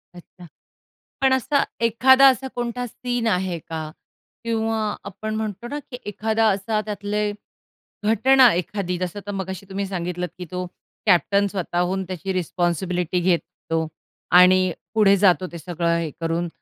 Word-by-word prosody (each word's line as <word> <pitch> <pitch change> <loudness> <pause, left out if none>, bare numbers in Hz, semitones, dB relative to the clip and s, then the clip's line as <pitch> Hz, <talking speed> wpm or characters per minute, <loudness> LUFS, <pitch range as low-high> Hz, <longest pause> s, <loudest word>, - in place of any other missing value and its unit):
अच्छा, 175 +1 -14 0.8
पण 265 -1 +4
असा 275 +2 +2 0.2
एखादा 260 +4 +6
असा 265 +1 -1
कोणता 245 0 -3
सीन 245 0 -3
आहे 185 -4 0
का? 160 0 -6 0.5
किंवा 225 -1 -1 0.2
आपण 210 +2 -5
म्हणतो 215 +1 -4
ना, 290 +4 -4
की 250 - -5
एखादा 220 +2 0
असा 210 +2 0
त्यातले 210 0 -2 0.7
घटना 250 +3 +6
एखादी 180 +1 -2
जसं 185 +2 -3
तर - - -2
मगाशी 190 -1 -5
तुम्ही 195 +1 -3
सांगितलंत, 180 -1 -3
की 180 - -6
तो 180 0 -3 0.4
कॅप्टन 200 +1 +3
स्वतःहून 185 -1 -1
त्याची 185 +1 -4
रिस्पॉन्सिबिलिटी 180 0 -1
घेतो 165 -2 -1 0.5
आणि 185 0 +5 0.2
पुढे 210 -3 +5
जातो 185 -1 +3
ते 170 - -7
सगळं 170 0 -1
हे 165 -1 -2
करून 165 +1 -1
195 Hz, 135 wpm, -23 LUFS, 180-220 Hz, 0.8 s, एखादा